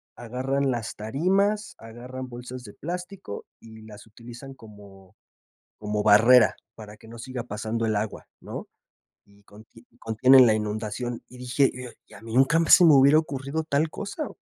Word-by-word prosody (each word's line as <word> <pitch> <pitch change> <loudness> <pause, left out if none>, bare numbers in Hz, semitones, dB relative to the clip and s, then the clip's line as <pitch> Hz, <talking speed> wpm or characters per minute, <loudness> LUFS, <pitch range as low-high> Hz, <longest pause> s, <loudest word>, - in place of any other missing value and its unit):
agarran 130 +3 -2
las 115 -2 -4
tarimas, 195 - -1
agarran 125 +3 -9
bolsas 125 +1 -9
de 105 -4 -12
plástico 180 - -7 0.2
y 110 -1 -14
las 105 -1 -13
utilizan 120 +4 -12
como, 100 -5 -16 0.6
como 105 0 -3
barrera 110 +3 +5 0.2
para 105 -1 -11
que 110 - -18
no 115 - -11
siga 125 0 -6
pasando 110 +1 -4
el 110 - 0
agua 105 +1 -4
¿no? - - -8 0.6
Y 100 0 -25 0.3
y 115 +1 -20
contienen 125 +3 +5
la 110 - +3
inundación, 110 +3 -4
y 125 - -14
dije: 125 +2 +1 0.3
"Y - - -18
a 100 - -13
mí 115 0 -8
nunca 135 +6 +4
se 180 - +8
me 160 - +7
hubiera 140 +3 +6
ocurrido 145 0 -4
tal 155 +1 0
cosa". 235 - -6
120 Hz, 160 wpm, -25 LUFS, 110-135 Hz, 0.6 s, se